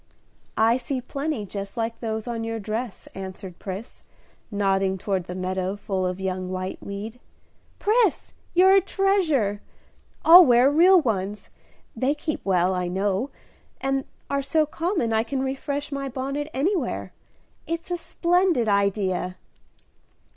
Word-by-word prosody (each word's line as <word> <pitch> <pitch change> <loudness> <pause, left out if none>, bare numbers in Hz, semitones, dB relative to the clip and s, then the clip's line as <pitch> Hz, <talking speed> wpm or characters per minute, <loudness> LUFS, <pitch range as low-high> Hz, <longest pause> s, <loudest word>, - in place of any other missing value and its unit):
"I 225 +2 +4
see 260 +1 -3
plenty 275 -2 -3
just 200 +1 -7
like 230 0 -2
those 220 -2 -3
on 230 -1 -3
your 225 0 -3
dress," 220 +1 -4
answered 190 -1 -8
Pris, 195 +4 -7 0.5
nodding 195 -2 +1
toward 190 -1 -2
the 180 - -6
meadow 185 +1 -2
full 190 -2 -2
of 180 +1 -4
young 185 -1 -3
whiteweed. 200 +4 -5 0.6
"Pris, 430 -3 +1 0.2
you're 375 +2 +7
a 390 - +6
treasure! 335 - +1 0.6
I'll 350 +3 +11
wear 250 -1 +5
real 360 +5 +7
ones; 210 - -2 0.4
they 270 +3 +1
keep 305 +1 -4
well, 185 -1 +2
I 180 -1 -1
know, 195 +7 0 0.5
and 270 0 -1 0.2
are 280 0 0
so 305 +3 +2
common 325 - -1
I 220 - +3
can 260 +3 -2
refresh 280 +2 -3
my 275 -1 -3
bonnet 275 +3 -3
anywhere. 345 +9 -1 0.5
It's 335 +2 -4
a 350 - 0
splendid 345 -7 +1
idea." 200 -3 +1
230 Hz, 135 wpm, -25 LUFS, 195-290 Hz, 0.6 s, I'll